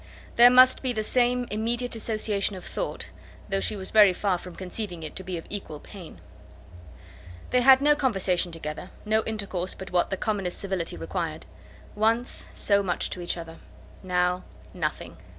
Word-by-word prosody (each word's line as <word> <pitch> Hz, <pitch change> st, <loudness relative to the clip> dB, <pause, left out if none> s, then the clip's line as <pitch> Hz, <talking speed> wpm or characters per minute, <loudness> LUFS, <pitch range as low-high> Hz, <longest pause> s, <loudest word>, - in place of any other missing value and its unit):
There 240 Hz, +1 st, +9 dB
must 255 Hz, +1 st, +6 dB
be 255 Hz, -2 st, -1 dB
the 215 Hz, -2 st, -1 dB
same 245 Hz, +2 st, +2 dB
immediate 235 Hz, +3 st, 0 dB
association 215 Hz, -3 st, -1 dB
of 185 Hz, -, -9 dB
thought, -, -, -4 dB, 0.4 s
though 195 Hz, -, 0 dB
she 215 Hz, -, -1 dB
was 190 Hz, -2 st, -7 dB
very 210 Hz, -3 st, +7 dB
far 185 Hz, -1 st, 0 dB
from 180 Hz, -1 st, -10 dB
conceiving 180 Hz, -2 st, -6 dB
it 155 Hz, -, -7 dB
to 190 Hz, -, -5 dB
be 185 Hz, -1 st, -4 dB
of 165 Hz, -, -8 dB
equal 175 Hz, -7 st, -6 dB
pain. 170 Hz, -, -12 dB, 1.3 s
They 250 Hz, -, +4 dB
had 265 Hz, +1 st, +7 dB
no 295 Hz, +1 st, +5 dB
conversation 190 Hz, -10 st, +1 dB
together, 165 Hz, +2 st, -6 dB, 0.2 s
no 220 Hz, +1 st, +2 dB
intercourse 195 Hz, -4 st, -3 dB
but 190 Hz, -, -9 dB
what 180 Hz, -1 st, +2 dB
the 190 Hz, -, -2 dB
commonest 195 Hz, -5 st, -2 dB
civility 190 Hz, -, -3 dB
required. 80 Hz, +1 st, -4 dB, 0.5 s
Once 225 Hz, +3 st, 0 dB
so 200 Hz, -1 st, +2 dB
much 180 Hz, -3 st, -2 dB
to 180 Hz, -, -4 dB
each 175 Hz, 0 st, -2 dB
other! 165 Hz, -1 st, -8 dB, 0.4 s
Now 180 Hz, -1 st, 0 dB, 0.3 s
nothing! -, -, -4 dB
195 Hz, 170 wpm, -26 LUFS, 180-225 Hz, 1.3 s, There